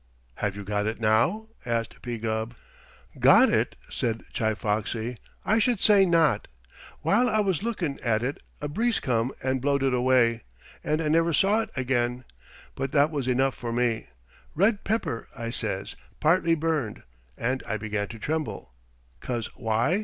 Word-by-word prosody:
"Have 100 -2 -1
you 100 - -6
got 105 +1 -1
it 110 +1 -3
now?" 115 - +2
asked 115 -1 -2
P. 120 -1 -4
Gubb. 110 +1 -3 0.6
"Got - - +7
it?" - - +1
said 115 -2 -2
Chi 110 -1 0
Foxy. 110 +3 -2 0.3
"I 220 +2 +3
should 230 -1 +2
say 200 -3 +6
not. 165 -3 +3 0.5
While 245 +5 +3
I 215 - +1
was 195 -5 +1
lookin' 195 -11 -2
at 115 -1 0
it 135 +3 -2 0.2
a 150 - -2
breeze 225 +10 +1
come 120 0 0
and 130 0 0
blowed 140 0 +1
it 135 -1 +2
away, 125 -2 +3 0.4
and 155 +2 0
I - - -1
never 165 +2 +3
saw 200 +8 +3
it 220 - -5
again, 125 -1 0 0.5
but 135 0 -4
that 145 +2 +4
was 140 -5 -2
enough 130 +1 +2
for 120 -1 -5
me. 115 - 0 0.5
'Red 200 +5 +2
pepper,' 205 - -2
I 115 0 -4
says, - - -3 0.2
'partly 165 +1 +3
burned,' 155 -8 -2 0.3
and 130 +3 -1
I 110 - -1
began 105 -1 -2
to 115 - -9
tremble. 110 - -3 0.5
'Cause 120 -3 -4
why? 115 - +1
130 Hz, 165 wpm, -26 LUFS, 115-165 Hz, 0.6 s, Got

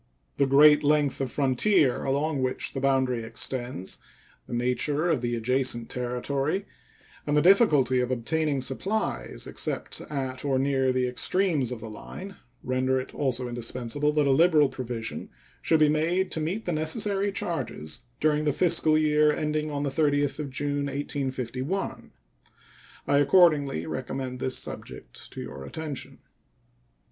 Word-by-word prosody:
The 140 - +3
great 150 +2 +6
length 145 -2 +2
of 135 - -1
frontier 140 +1 +2
along 140 +1 0
which 130 0 -2
the 135 - -3
boundary 130 -3 +1
extends, 120 -3 -3 0.5
the - - -7
nature 135 +6 0
of 145 -7 0
the 120 -1 -1
adjacent 120 0 0
territory, 135 +8 -2 0.6
and 145 0 +2
the - - +5
difficulty 150 - +5
of 125 0 0
obtaining 140 +3 -1
supplies 190 +12 -2
except - - -3
at 130 -3 -4
or 135 -2 +1
near 135 -1 +2
the 130 0 +1
extremes 150 0 +1
of 120 -3 -5
the 115 - -7
line 195 - -9 0.3
render 130 +1 +1
it 130 - -7
also 130 -3 -1
indispensable 120 +4 -2
that 150 -1 +2
a 140 - +3
liberal 155 0 +5
provision 125 -3 -5 0.3
should 160 - +2
be 155 - +6
made 170 +5 +1
to - - -2
meet 185 +8 -3
the 175 - -1
necessary 195 +6 0
charges 125 - -4
during 150 0 +2
the 150 - +3
fiscal 160 -1 +3
year 150 -1 +4
ending 155 0 -1
on 145 -1 -3
the 140 - -1
30th 145 0 +1
of 150 -2 -3
June, 145 +1 -2
1851. 135 +3 -3 1.0
I 140 0 +4
accordingly 145 - +4
recommend 125 - -4
this 130 0 0
subject - - -8
to - - -6
your 65 - -8
attention. 150 - -6
140 Hz, 145 wpm, -27 LUFS, 130-155 Hz, 1.0 s, great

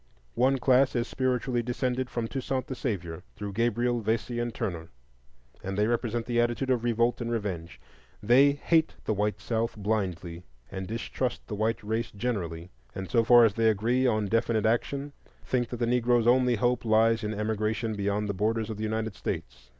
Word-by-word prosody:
One 130 - +3
class 130 +1 +3
is 120 0 0
spiritually 125 -1 0
descended 125 +1 -2
from 120 -2 -3
Toussaint 130 +1 -3
the - - -5
Savior, 90 - -4
through 100 -1 -6
Gabriel, 120 +2 +1
Vesey, 115 +2 -1
and 120 0 -1
Turner, 85 -9 -4 0.7
and 95 0 -4
they 105 - +3
represent 120 0 -1
the 120 -1 +1
attitude 120 +3 0
of 120 -2 +1
revolt 120 +1 +1
and 115 - -2
revenge; 95 -7 -4 0.4
they 135 +6 +6
hate 160 +3 +1
the - - +1
white 105 +1 -1
South 115 0 -2
blindly 95 -5 -2 0.3
and 95 -1 -5
distrust 115 +3 -3
the - - -7
white 110 +2 -1
race 110 +2 -2
generally, 90 -7 -4 0.2
and 95 -1 -6
so 115 -2 +4
far 120 0 +7
as 110 - +2
they 115 0 +3
agree 120 +5 +2
on 110 -3 +1
definite 115 +1 +1
action, 140 +5 0 0.3
think 120 -2 0
that 120 - -5
the 120 - 0
Negro's 120 -1 +2
only 125 0 +4
hope 120 +3 +1
lies 115 0 +3
in 105 0 -2
emigration 110 +1 -1
beyond 100 +1 -1
the 100 - -1
borders 110 +3 -1
of 110 - -5
the 110 - -4
United 110 0 -2
States. 60 0 -6
115 Hz, 180 wpm, -28 LUFS, 105-120 Hz, 0.7 s, far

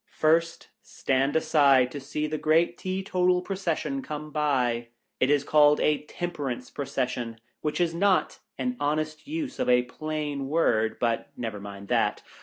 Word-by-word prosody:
First, 165 +2 +1
stand 135 +2 -1
aside 140 -5 +4
to 145 - -5
see 145 +3 -3
the 155 0 -3
great 165 +2 +3
Tee 190 +1 -3
total 180 -1 +2
Procession 165 -8 -2
come 150 +2 -6
by. 125 -6 0 0.3
It 130 - +3
is 145 -1 +3
called 150 0 +5
a 150 -1 +2
Temperance 145 -8 -4
Procession 125 -4 -3
— - - -46
which 150 +2 -2
is 170 -2 +1
not 190 +2 +2 0.2
an 250 -1 -2
honest 155 - -2
use 300 -2 -4
of - - 0
a 125 0 +5
plain 145 +1 -4
word, 110 -8 +1
but 115 -1 0
never 110 -4 -4
mind 100 0 -9
that. - - +1
150 Hz, 160 wpm, -27 LUFS, 130-165 Hz, 0.3 s, called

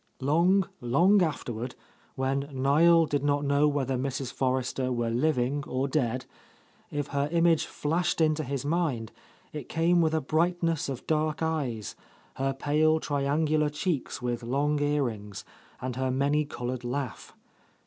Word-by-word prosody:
Long, 170 +7 +3
long 175 +12 +4
afterward, 125 -7 -2 0.4
when 135 +2 -1
Niel 155 +5 +4
did 145 -2 -1
not 145 0 +1
know 140 +1 +3
whether 135 -3 0
Mrs. 130 0 -3
Forrester 130 0 -1
were 120 -2 -1
living 135 +1 +1
or 130 +2 -1
dead, 130 -3 -1 0.6
if 145 -1 -3
her 140 +1 -1
image 170 -1 +3
flashed 170 +4 -1
into 155 -1 +2
his 140 0 -4
mind, 145 -9 -1 0.4
it 150 -4 -7
came 170 +2 +3
with 160 -1 +2
a - - +2
brightness 165 +1 0
of 130 -3 -5
dark 155 0 0
eyes, 135 - -2 0.4
her 135 0 0
pale 155 +3 +2
triangular 150 +1 +1
cheeks 150 -4 -3
with 120 -1 -2
long 140 +5 0
earrings, 120 -9 -2 0.3
and 125 -1 -4
her 130 0 0
many 140 +3 +1
coloured 125 -3 -5
laugh. 125 0 -4
145 Hz, 140 wpm, -28 LUFS, 130-155 Hz, 0.6 s, long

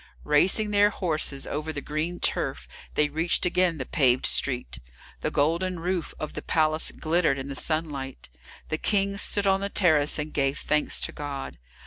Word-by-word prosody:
Racing 190 +8 +3
their 205 0 +5
horses 155 -8 -2
over 150 +2 -4
the 150 - -4
green 155 +5 -3
turf, 60 0 -1 0.3
they 150 - +3
reached 160 +5 0
again 180 -2 +2
the 130 - -4
paved 130 -5 +2
street. 125 -3 0 0.4
The - - -1
golden 170 +5 0
roof 180 0 -3
of 155 - -5
the - - -5
palace 155 0 +2
glittered 160 -3 +1
in 135 +1 -6
the 135 - -5
sunlight. 145 -4 -3 0.4
The 155 - -2
King 200 -1 +1
stood 205 0 +1
on 195 0 +2
the 200 - -2
terrace 155 -7 +3
and 150 0 -4
gave 140 0 0
thanks 150 0 +1
to - - 0
God. 140 - -6
155 Hz, 170 wpm, -26 LUFS, 145-180 Hz, 0.4 s, their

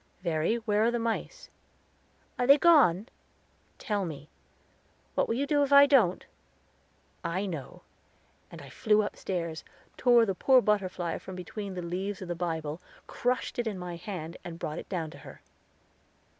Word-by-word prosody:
"Verry, 165 +4 +1
where 220 -2 +1
are - - +4
the 240 - -1
mice?" 230 - -3 0.9
"Are 245 - +1
they 280 +1 +8
gone?" 265 - +5 0.7
"Tell 205 -2 -2
me." 150 -4 -7 0.8
"What - - +1
will 230 - -1
you 275 +4 0
do 290 0 +2
if 285 -1 0
I 280 0 +9
don't?" 245 -11 +3 1.0
"I 185 +4 -2
know," 160 -9 -7 0.7
and 165 -3 -11
I 140 - -11
flew 215 +4 +2
upstairs, 170 -5 -4 0.3
tore 240 -2 +5
the 195 - -1
poor 260 +7 +5
butterfly 185 -6 -1
from 190 - -9
between 190 +2 -6
the 180 - -4
leaves 185 +3 -3
of 185 - -8
the - - 0
Bible, 165 -2 -4 0.2
crushed 250 +1 -2
it 235 - -1
in 210 -3 -3
my 180 -1 -6
hand, 170 -2 -7
and 170 -1 -7
brought 155 -1 -4
it - - -10
down 165 -4 -3
to - - -12
her. - - -13
190 Hz, 165 wpm, -29 LUFS, 170-235 Hz, 1.0 s, I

